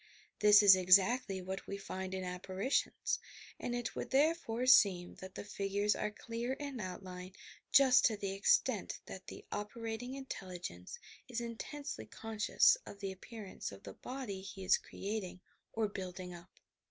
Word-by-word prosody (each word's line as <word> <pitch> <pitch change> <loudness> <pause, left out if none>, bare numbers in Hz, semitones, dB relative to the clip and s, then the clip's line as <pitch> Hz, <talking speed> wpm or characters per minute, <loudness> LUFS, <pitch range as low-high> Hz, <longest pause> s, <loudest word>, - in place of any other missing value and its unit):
This 210 0 +8
is 200 -2 +10
exactly 190 +2 +4
what 190 +1 -5
we 200 - -4
find 190 -1 -5
in 190 - -3
apparitions; 185 +6 -1 0.4
and 240 - -2
it 240 -1 -3
would - - -4
therefore 270 -4 +2
seem 190 -8 +5
that 190 0 -9
the - - -5
figures 200 0 0
are - - -1
clear 230 +4 -4
in 280 -2 -5
outline 185 -1 -7 0.4
just 265 -2 +7
to 220 - +3
the 200 -1 -3
extent 195 +1 +2
that - - -9
the - - -9
operating 225 +4 -4
intelligence 180 - -7 0.3
is 245 -2 -3
intensely 235 - -6
conscious 225 - +3
of 200 - -10
the 195 -1 -3
appearance 200 +1 -7
ol 100 - -9
the 100 0 -10
body 250 - -6
he 195 0 -8
is 185 - +4
creating 200 -3 -5 0.3
or 220 -1 0
building 185 -2 -6
up. 170 +1 -12
200 Hz, 155 wpm, -35 LUFS, 185-235 Hz, 0.4 s, is